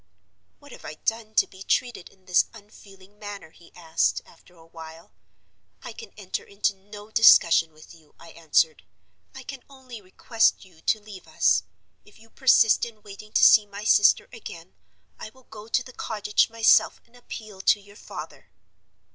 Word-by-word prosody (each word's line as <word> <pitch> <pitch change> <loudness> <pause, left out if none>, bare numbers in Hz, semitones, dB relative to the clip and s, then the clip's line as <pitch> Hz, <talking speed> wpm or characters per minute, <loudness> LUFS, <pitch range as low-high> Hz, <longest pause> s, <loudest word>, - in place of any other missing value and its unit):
'What 285 -1 -18
have - - -13
I 155 - -8
done 220 +4 -4
to - - +4
be 190 - -17
treated 240 -2 -2
in 190 -1 -28
this 180 - +3
unfeeling 200 -1 -18
manner?' 205 -6 -9
he 170 - -20
asked, 165 -2 -1
after 175 +1 -22
a 165 -1 -19
while. 165 0 -13 0.7
'I - - -8
can 455 - -12
enter 195 -3 -5
into 200 0 -2
no 205 +2 -14
discussion 165 -7 +5
with 155 +2 -17
you,' 160 -3 -22
I 170 - -14
answered; 160 -1 0 0.5
'I - - -10
can 270 -3 -10
only 260 -5 -12
request 225 +4 0
you 170 -4 -22
to 220 - 0
leave 205 -3 -13
us. - - +2 0.4
If 210 - -21
you 225 0 -21
persist 245 -4 +4
in 220 -3 -7
waiting 210 +1 -13
to - - +3
see 210 -1 +7
my 200 +1 -9
sister 205 -1 +4
again, 180 -6 -11 0.5
I - - -8
will 260 +4 -23
go 215 -2 -13
to 245 +2 0
the 255 - -14
cottage 210 -3 -1
myself 225 0 +3
and 235 - -26
appeal 215 -5 -10
to 205 - +3
your 200 0 -18
father. - - -11
205 Hz, 175 wpm, -24 LUFS, 180-225 Hz, 0.7 s, see